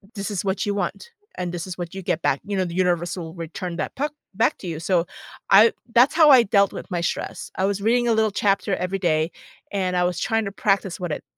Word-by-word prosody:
This 200 +1 -4
is 200 -1 -3
what 190 0 -1
you 205 - 0
want, 340 - -4 0.2
and 180 -1 -3
this 175 +2 -5
is 185 - -6
what 175 -2 -6
you 190 - -6
get 170 -2 -1
back. 135 - +1
You 205 0 -3
know, 190 - +1
the 170 - -6
universe 175 -1 0
will 165 -2 -6
return 170 +1 -6
that - - -4
puck 295 +3 -2 0.2
back 220 +4 +1
to 185 - -8
you, 160 -2 -4
so, 170 0 +1 0.4
I 210 +4 +7 0.2
that's 245 +5 +5
how 315 -2 +7
I 260 -4 +8
dealt 200 -2 +3
with - - -8
my 175 -3 -2
stress. - - -4
I 190 - +1
was 200 0 -1
reading 240 +3 +2
a 230 - +3
little 220 -1 +2
chapter 200 0 +1
every 185 +2 -2
day, 160 -3 +1 0.4
and 185 -2 0
I 180 - +2
was 175 -1 -1
trying 225 -1 0
to 200 - -4
practice 195 -3 0
what 175 -3 -4
it - - -4
190 Hz, 255 wpm, -23 LUFS, 175-205 Hz, 0.4 s, I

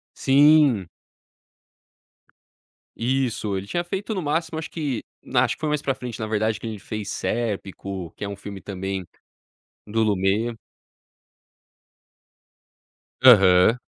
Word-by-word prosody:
Sim. 140 - +5 2.1
Isso, 120 -5 -1
ele 95 +1 -4
tinha 175 +7 -1
feito 200 +4 -3
no 185 - -2
máximo, 160 +1 -1
acho 160 - -6
que 145 -8 -3 0.2
na - - +2
acho - - -2
que - - -29
foi 155 - 0
mais 150 -1 0
pra 135 -2 -1
frente, 125 -2 -7
na 110 - -3
verdade, 110 0 0
que 115 - -6
ele 110 -2 -5
fez 105 0 -6
Serpico, 100 -6 -3
que - - -7
é - - -2
um 100 - -5
filme 100 -1 -8
também 95 -2 -5 0.8
do 110 +2 +1
Lumet. 105 +3 +1 2.7
Aham, 100 -2 +7
110 Hz, 130 wpm, -23 LUFS, 100-140 Hz, 2.7 s, Aham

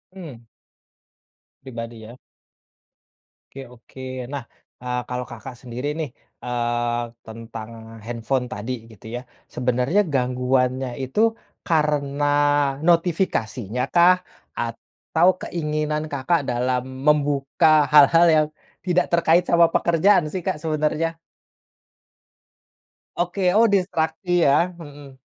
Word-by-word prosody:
Mmm. 130 -11 -10 1.1
Pribadi 115 -3 -8
ya. 115 +3 -12 1.4
Oke 135 - -9
oke 125 +2 -14 0.3
nah, 140 -3 -4 0.4
eee, 125 0 -2
kalau 125 0 -3
Kakak 120 +2 -9
sendiri 125 +3 -5
nih, 155 - -2 0.3
eee, 120 -1 -1 0.2
tentang 115 0 -9 0.4
handphone 120 +2 -2
tadi 115 +2 -5 0.2
gitu 110 0 -17
yah. 125 - -5 0.3
Sebenarnya 125 +9 +1
gangguannya 125 0 0
itu 130 +10 -3 0.5
karena 150 -3 +1 0.6
notifikasinya 145 - 0
kah 175 +1 +7 0.4
atau 120 +8 -1
keinginan 150 -2 -2
Kakak 145 +5 +1
dalam 125 +1 0 0.2
membuka 145 +1 +3
hal-hal 150 +4 +7
yang 155 -1 +3 0.4
tidak 180 -1 +2
terkait 170 +1 +4
sama 170 0 +5
pekerjaan 170 +2 +3
sih 185 - -4
Kak, 175 -5 -1
sebenarnya? 155 +1 -1 2.0
Oke. 180 +1 0
Oh 230 +2 +6
distraksi 175 -2 0
ya? 170 +6 +3
Heeh. 145 -3 -12
140 Hz, 100 wpm, -22 LUFS, 125-165 Hz, 2.0 s, kah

